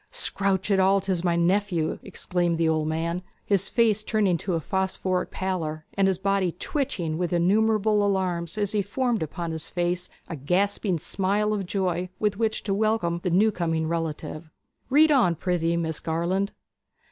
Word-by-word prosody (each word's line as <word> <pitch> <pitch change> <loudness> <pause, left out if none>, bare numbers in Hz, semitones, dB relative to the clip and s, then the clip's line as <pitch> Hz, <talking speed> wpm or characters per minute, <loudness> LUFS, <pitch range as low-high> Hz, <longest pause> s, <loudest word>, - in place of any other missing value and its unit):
'Scrounch 200 - 0
it 195 - +4
all 195 +1 +4
'tis 185 -3 -2
my 175 -2 +2
nephew!' 175 -1 +1
exclaimed 175 -2 -1
the 165 0 +2
old 155 -1 +1
man, 165 +3 -1 0.2
his 195 -1 +1
face 220 -3 +2
turning 210 -5 +2
to 175 +2 -2
a - - 0
phosphoric 190 +1 -1
pallor, 160 -5 -3
and 195 -1 +2
his 190 -2 +1
body 195 -2 0
twitching 180 - -2
with 175 -2 -1
innumerable 210 +4 +3
alarms 185 -3 -1
as 205 -1 0
he 210 - +1
formed 235 +4 -1
upon 165 +2 -4
his 160 -1 -4
face 175 0 -1 0.2
a 165 - -5
gasping 185 - 0
smile 200 +5 0
of 200 -3 -3
joy, 180 -2 -1
with 210 -2 0
which 220 +1 -1
to 200 - -1
welcome 210 -5 +1
the 180 - 0
new 205 +6 +4
coming 165 -4 -1
relative. 160 -1 -4 0.4
'Read 305 +3 +5
on, 235 - +4
prithee, 170 -1 0
Miss 160 -2 -2
Garland.' 175 +5 -1
185 Hz, 170 wpm, -25 LUFS, 170-205 Hz, 0.4 s, Read